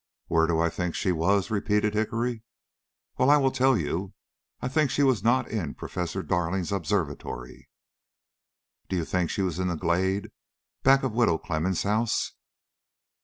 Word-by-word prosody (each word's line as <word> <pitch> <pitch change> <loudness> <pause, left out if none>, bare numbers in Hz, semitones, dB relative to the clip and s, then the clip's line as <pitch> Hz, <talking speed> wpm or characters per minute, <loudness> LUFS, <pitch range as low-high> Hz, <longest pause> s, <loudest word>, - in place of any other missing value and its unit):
"Where 80 0 +2
do 80 -1 +1
I 85 +1 +3
think 90 -1 -3
she 95 - 0
was?" 95 +5 +1
repeated 105 0 +1
Hickory. 115 +2 -1 0.8
"Well, 130 - +4
I 145 - +7
will 135 -2 +2
tell 130 -1 +3
you. 90 +4 -3 0.4
I - - -3
think 140 +2 +2
she 145 - +1
was 130 -8 +3
not 120 +3 +3
in 90 -10 -3
Professor 90 +1 -4
Darling's 90 0 -1
observatory." 80 -9 -3 1.2
"Do 95 - -1
you 85 -3 -1
think 90 -1 0
she 100 - -1
was 90 -2 -2
in 90 - 0
the 90 - -1
glade 95 +4 0 0.5
back 135 +1 +5
of 130 -4 -1
Widow 115 -8 +3
Clemmens' 85 +2 -1
house?" 110 +3 0
95 Hz, 160 wpm, -27 LUFS, 85-115 Hz, 1.2 s, I